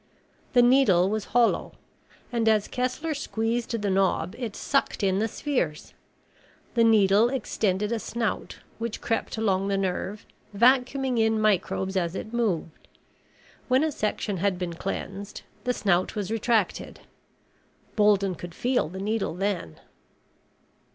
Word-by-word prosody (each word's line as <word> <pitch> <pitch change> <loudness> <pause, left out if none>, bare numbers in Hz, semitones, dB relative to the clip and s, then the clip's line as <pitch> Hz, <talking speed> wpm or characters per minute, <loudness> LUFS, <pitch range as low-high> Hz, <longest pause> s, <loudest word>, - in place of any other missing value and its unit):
The 245 -2 +6
needle 210 -8 +4
was 215 -1 -2
hollow 240 -1 +1 0.6
and 230 -2 +2
as 215 -2 +2
Kessler 255 +6 -2
squeezed 230 -3 -2
the 205 -1 -1
knob 190 -2 +1
it 235 -4 -5
sucked 275 -5 0
in 190 0 +2
the 220 - +1
spheres. 215 - -3 0.8
The 235 - +3
needle 215 0 +5
extended 210 -5 -1
a 230 - 0
snout 230 0 -3 0.2
which 230 -1 -4
crept 225 0 -2
along 195 -3 +1
the 200 -1 0
nerve, 195 +2 -3 0.3
vacuuming 255 +2 +3
in 220 0 +2
microbes 190 -2 +1
as 175 -1 0
it 220 +3 -6
moved. 200 -9 -2 0.8
When 260 +3 +3
a 315 - +1
section 210 -4 -2
had 190 +1 0
been 180 -1 -3
cleansed, 195 +3 -5 0.2
the 250 - +2
snout 190 -3 +1
was 210 -1 -3
retracted. 225 -3 0 0.9
Bolden 205 -3 +3
could 175 0 -9
feel 245 -11 0
the 185 - -8
needle 210 -3 -1
then. 185 - -3
215 Hz, 135 wpm, -26 LUFS, 190-235 Hz, 0.9 s, The